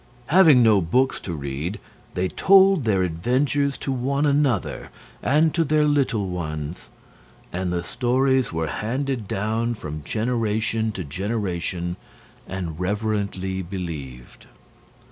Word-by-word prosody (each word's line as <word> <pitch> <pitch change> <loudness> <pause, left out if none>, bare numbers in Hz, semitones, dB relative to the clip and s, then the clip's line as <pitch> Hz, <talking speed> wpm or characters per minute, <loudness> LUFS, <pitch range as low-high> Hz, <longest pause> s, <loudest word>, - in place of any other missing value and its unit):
Having 160 -9 +7
no 110 -4 +5
books 130 +11 +1
to 85 - -6
read 70 +6 -4 0.4
they 90 +1 0
told 190 - +5
their 95 -4 +2
adventures 130 - 0
to 135 - -3
one 135 +3 0
another 140 -3 0 0.3
and 155 +2 +3
to 170 -1 +2
their 155 0 +2
little 135 -9 +1
ones; 75 -3 -5 0.6
and 90 0 -2
the 85 -1 -1
stories 130 +4 +1
were 80 0 -1
handed 125 - -3
down 110 +4 -1
from 75 -6 -7
generation 110 +1 0
to 95 - -4
generation 90 0 -3 0.5
and 85 -4 -5
reverently 100 -1 -2
believed. 80 -9 -7
105 Hz, 120 wpm, -23 LUFS, 90-130 Hz, 0.6 s, Having